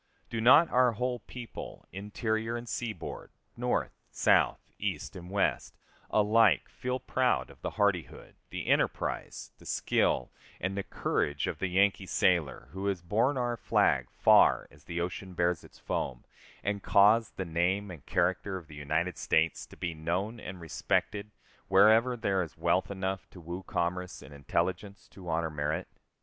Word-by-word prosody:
Do 115 - -2
not 145 +8 +7
our 125 -1 +4
whole 125 +2 -2
people, 120 +2 -9
interior 110 +3 -2
and 120 0 -8
seaboard, 115 -1 -5 0.3
North, - - 0 0.2
South, - - +3 0.2
East, - - -3
and 90 -1 -9
West, 100 +1 0 0.3
alike 105 -1 +4
feel 125 +1 -3
proud 130 -1 0
of - - -18
the - - -2
hardihood, 100 -5 0 0.2
the - - -5
enterprise, - - -1
the - - -16
skill, 60 - +1 0.3
and 95 +1 -2
the 100 - -1
courage 75 -6 -1
of - - -3
the 95 - 0
Yankee 95 +1 +2
sailor, 80 -11 +1
who 95 +3 -4
has 95 -4 -1
borne 115 +10 +1
our 120 -1 0
flag - - +2
far - - +5
as 70 0 -20
the 85 0 -4
ocean 90 +1 -4
bears 85 0 +1
its - - -16
foam, 60 -2 -3 0.4
and 100 0 -1
caused 105 +4 +4
the 95 - -2
name 90 +4 0
and 80 -6 -10
character 95 +2 0
of 90 - -10
the 80 - -14
United 80 +4 -1
States 80 0 +1
to - - -15
be 85 -2 -3
known 90 +8 -2
and 95 -3 -7
respected 100 +5 -1 0.4
wherever 110 +6 +5
there 100 -4 +1
is 85 - -6
wealth - - +1
enough 95 -1 -3
to 90 - -13
woo 85 +2 -6
commerce, 90 0 -3
and 70 - -12
intelligence 95 +8 -2
to 90 -3 -10
honor 80 0 0
merit? 75 +4 -2
95 Hz, 160 wpm, -30 LUFS, 85-110 Hz, 0.4 s, not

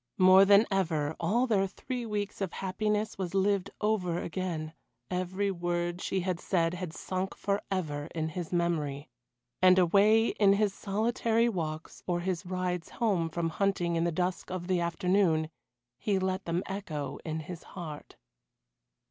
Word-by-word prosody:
More 185 +1 +8
than 200 +2 +7
ever 160 -6 0
all 240 +5 +2
their 200 -5 +2
three 240 +5 -5
weeks 205 -1 -3
of 190 -3 -2
happiness 210 +3 -1
was 185 0 -3
lived 195 0 +2
over 200 -5 +1
again 165 -3 -3 0.4
every 185 +2 -1
word 175 0 -2
she 190 - -1
had 180 -1 -2
said 170 -3 +1
had 180 -2 -4
sunk 185 +3 -3
for 200 0 -1
ever 150 -6 -2
in 160 -1 -1
his 170 0 -5
memory. 155 -5 -1 0.5
And 185 0 +7
away 205 +5 +5
in 200 -2 +4
his 200 -1 +2
solitary 225 +3 +1
walks, 160 -6 -4
or 175 -1 0
his 180 0 -2
rides 180 -2 -2
home 195 -8 0
from 165 0 -1
hunting 175 -1 0
in 165 - +1
the 170 - +1
dusk 180 +2 -2
of 185 -1 -4
the 185 -1 +1
afternoon, 170 -1 +1 0.5
he 205 -2 +1
let 190 0 -1
them 170 +2 -1
echo 155 -8 -4
in 160 0 -3
his 170 +2 -8 0.2
heart. 155 -4 -7
185 Hz, 155 wpm, -30 LUFS, 170-200 Hz, 0.5 s, More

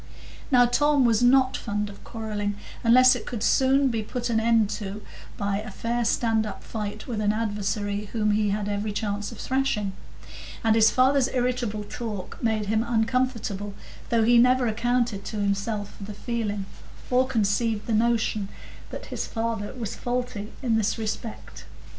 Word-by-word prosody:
Now, 250 -3 +6
Tom 285 +2 +3
was 230 -2 +3
not 255 +1 +4
fond 210 -2 -2
of 200 -1 -12
quarrelling, 210 -3 -3 0.3
unless 255 +2 +7
it 250 - -5
could 230 -3 -4
soon 270 +1 +4
be 225 -2 -1
put 240 +2 -3
an 220 - +2
end 225 -2 +3
to 205 0 -5 0.3
by 200 0 -1
a 215 +1 -7
fair 235 +4 -2
stand 225 -1 +2
up 200 -3 -7
fight 210 -1 -5
with 225 -4 -3
an 205 -1 +2
adversary 205 -1 -2
whom 210 0 0
he 210 0 +2
had 205 0 -1
every 205 +1 -2
chance 205 0 -2
of 230 - -10
thrashing; 260 -7 -1 0.7
and 225 -1 +4
his 220 -1 +6
father's 265 +1 +3
irritable 245 -4 -1
talk 210 -3 -6
made 220 -2 0
him 220 +2 +1
uncomfortable, 225 -4 -1 0.3
though 230 -1 +3
he 235 +1 +6
never 250 +1 +4
accounted 235 -2 0
to - - -5
himself 205 +1 -2
for 200 - -8
the 210 0 -8
feeling, 210 -4 -3 0.5
or 255 +1 +3
conceived 220 -2 0
the 230 - -1
notion 220 -2 +1 0.4
that - - -7
his - - -3
father 225 -3 -3
was 225 -2 -4
faulty 245 -4 -3
in 230 -3 +2
this 220 -2 0
respect. 220 - -6
220 Hz, 165 wpm, -25 LUFS, 205-240 Hz, 0.7 s, unless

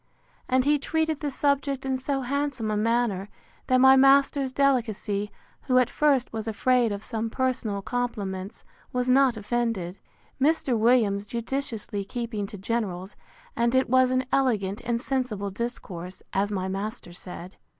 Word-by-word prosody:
And 255 0 +3
he 295 0 +3
treated 315 +1 -1
the 295 - -2
subject 280 -1 0
in 265 -1 0
so 270 +1 -2
handsome 265 -4 -2
a - - 0
manner, 215 -3 0 0.4
that 255 - +4
my 265 +1 +8
master's 275 0 +4
delicacy, 225 -7 0 0.4
who, 255 -2 +3
at 250 -2 +3
first, 280 -6 +2
was 220 0 -4
afraid 240 +1 +2
of 200 +1 -4
some 225 -1 -3
personal 225 -5 -1
compliments, 205 -6 -4 0.3
was 250 0 0
not 260 -3 +4
offended. 210 -4 -2 0.4
Mr. 285 -3 +2
Williams 220 -3 +3
judiciously 230 -3 -3
keeping 220 -1 -4
to 205 - -9
generals; 195 -2 -3 0.4
and 235 +2 +1
it 260 -2 +2
was 255 0 +5
an 255 0 +1
elegant 215 -6 +1
and 235 -1 0
sensible 240 -7 -2
discourse, 190 -5 -6
as 200 +2 +1
my 190 -2 -2
master 195 0 -5
said. 180 0 -9
235 Hz, 150 wpm, -26 LUFS, 205-260 Hz, 0.4 s, my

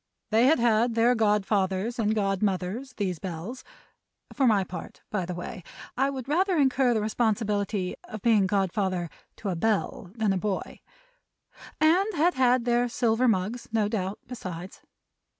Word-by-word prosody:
They 225 +3 +5
had 315 - +5
had 235 0 +2
their 235 +2 +4
Godfathers 210 0 +1
and 215 -1 +1
Godmothers, 195 +4 -1
these 185 -5 -2
Bells 190 +9 -6 0.7
(for 270 -2 +2
my 205 -4 +4
part, 185 0 -9
by 190 -5 -1
the 180 - -4
way, 180 +3 -6 0.3
I 270 +2 +2
would 265 -2 -5
rather 360 +5 +2
incur 265 -3 +3
the 215 - 0
responsibility 210 -3 0
of 215 -2 -8
being 215 -5 +4
Godfather 190 -3 0 0.2
to 205 - -5
a 185 - -1
Bell 205 0 -1
than 220 -4 +1
a 190 - -1
Boy), 200 -1 -3 1.0
and 355 +7 +4
had 340 +4 +3
had 255 -2 +3
their 240 0 +2
silver 235 +1 +1
mugs, 225 +3 0
no 220 -2 +2
doubt, 200 -2 -2
besides. 185 -7 -8
220 Hz, 150 wpm, -27 LUFS, 195-245 Hz, 1.0 s, They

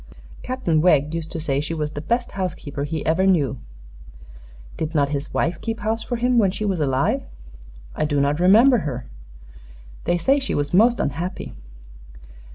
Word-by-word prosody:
Captain 250 -12 0
Wegg 150 -3 +3
used 165 -1 -4
to 165 - -4
say 140 -3 0
she 160 +2 -4
was 150 -1 -2
the 145 - -6
best 235 +8 -1
housekeeper 155 -7 -4
he 155 +1 -4
ever 180 +4 +2
knew." 145 -9 +2 1.2
"Did 160 +1 -4
not 140 -2 +2
his 145 0 -4
wife 170 - -1
keep 225 0 -4
house 220 +2 -1
for 240 - -3
him, 245 +1 +2
when 200 -4 +4
she 205 +3 -3
was 190 -4 0
alive?" 135 -3 +1 0.7
"I - - 0
do 145 -1 0
not 140 +2 +1
remember 225 +8 +6
her." 130 -8 -4 1.0
"They 175 - +2
say 270 +12 +2
she 270 - -3
was 145 +1 -2
most 235 +6 +5
unhappy." 170 +7 -3
165 Hz, 170 wpm, -22 LUFS, 145-215 Hz, 1.2 s, remember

